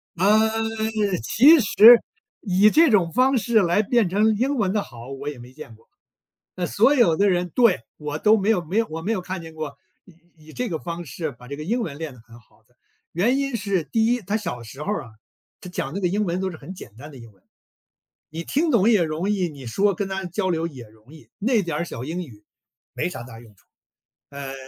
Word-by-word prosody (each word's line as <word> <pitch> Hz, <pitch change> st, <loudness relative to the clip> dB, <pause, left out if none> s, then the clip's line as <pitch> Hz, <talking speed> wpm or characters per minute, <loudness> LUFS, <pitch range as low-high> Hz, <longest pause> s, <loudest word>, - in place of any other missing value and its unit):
嗯， 220 Hz, +4 st, +2 dB, 0.5 s
其 280 Hz, -, +6 dB
实 230 Hz, +1 st, +8 dB, 0.4 s
以 195 Hz, +2 st, +4 dB
这 325 Hz, +4 st, +5 dB
种 185 Hz, -7 st, +2 dB
方 255 Hz, +4 st, +3 dB
式 230 Hz, -1 st, +2 dB
来 180 Hz, +3 st, +2 dB
变 225 Hz, -2 st, +1 dB
成 215 Hz, +4 st, +2 dB
英 265 Hz, +7 st, 0 dB
文 205 Hz, -7 st, 0 dB
的 210 Hz, -, +1 dB
好， 120 Hz, -4 st, -11 dB
我 140 Hz, +2 st, -5 dB
也 145 Hz, -, -8 dB
没 120 Hz, +1 st, -13 dB
见 130 Hz, -5 st, -11 dB
过。 110 Hz, -, -26 dB, 0.7 s
那 180 Hz, -, -2 dB
所 230 Hz, -, +3 dB
有 205 Hz, -, +4 dB
的 200 Hz, +2 st, +3 dB
人 180 Hz, -1 st, -1 dB
对， 230 Hz, -, +4 dB, 0.2 s
我 150 Hz, 0 st, -5 dB
都 215 Hz, +4 st, +4 dB
没 205 Hz, +1 st, 0 dB
有 185 Hz, -6 st, +2 dB
没 180 Hz, +7 st, -2 dB
有 230 Hz, -, +2 dB
我 160 Hz, +1 st, -5 dB
没 215 Hz, +7 st, -1 dB
有 200 Hz, -, -1 dB
看 185 Hz, 0 st, -5 dB
见 160 Hz, -1 st, -11 dB
过， 155 Hz, -3 st, -6 dB, 0.3 s
以 185 Hz, -, -19 dB, 0.3 s
以 -, -, -12 dB
这 250 Hz, +6 st, -3 dB
个 160 Hz, -, -3 dB
方 170 Hz, +1 st, -6 dB
式 160 Hz, +1 st, -5 dB
把 125 Hz, 0 st, -16 dB
这 140 Hz, -, -6 dB
个 150 Hz, -, -7 dB
英 235 Hz, +9 st, -1 dB
文 160 Hz, -11 st, -5 dB
练 160 Hz, -4 st, -6 dB
得 125 Hz, -, -16 dB
很 115 Hz, +1 st, -16 dB
好 110 Hz, -, -29 dB
的。 125 Hz, -, -35 dB, 0.4 s
原 230 Hz, +11 st, +1 dB
因 275 Hz, -3 st, -1 dB
是 200 Hz, -5 st, -1 dB
第 220 Hz, +8 st, 0 dB
一 245 Hz, +1 st, +1 dB
他 205 Hz, +1 st, -2 dB
小 170 Hz, -, -5 dB
时 135 Hz, +6 st, -10 dB
候 200 Hz, -, -2 dB
儿 165 Hz, -9 st, -3 dB
啊， 115 Hz, -, -14 dB, 0.5 s
他 180 Hz, -, -10 dB
讲 140 Hz, -4 st, -4 dB
这 200 Hz, -, -3 dB
个 180 Hz, -, +1 dB
英 205 Hz, +4 st, 0 dB
文 175 Hz, -1 st, -2 dB
都 190 Hz, 0 st, -2 dB
是 160 Hz, -, -9 dB
很 185 Hz, -, -10 dB
简 105 Hz, -, -12 dB
单 145 Hz, +6 st, -11 dB
的 140 Hz, -, -13 dB
英 115 Hz, -3 st, -13 dB
文。 95 Hz, -, -31 dB, 0.9 s
你 160 Hz, +2 st, -6 dB
听 310 Hz, -, 0 dB
懂 230 Hz, -4 st, +4 dB
也 210 Hz, -6 st, +4 dB
容 160 Hz, +5 st, -2 dB
易， 190 Hz, -4 st, 0 dB
你 140 Hz, -4 st, -11 dB
说 195 Hz, -, +1 dB
跟 195 Hz, +2 st, -3 dB
他 190 Hz, 0 st, -4 dB
交 185 Hz, +2 st, -2 dB
流 165 Hz, -1 st, -1 dB
也 135 Hz, -7 st, -9 dB
容 110 Hz, +7 st, -19 dB
易， 155 Hz, -, -17 dB
那 225 Hz, 0 st, +1 dB
点 170 Hz, -1 st, -3 dB
小 125 Hz, -, -7 dB
英 165 Hz, +6 st, -4 dB
语 110 Hz, -10 st, -14 dB, 0.5 s
没 -, -, -2 dB
啥 175 Hz, -, -7 dB
大 120 Hz, -2 st, -12 dB
用 115 Hz, -3 st, -17 dB
处。 95 Hz, -, -30 dB, 0.6 s
呃， 140 Hz, -1 st, -7 dB
180 Hz, 255 characters per minute, -23 LUFS, 150-215 Hz, 0.9 s, 实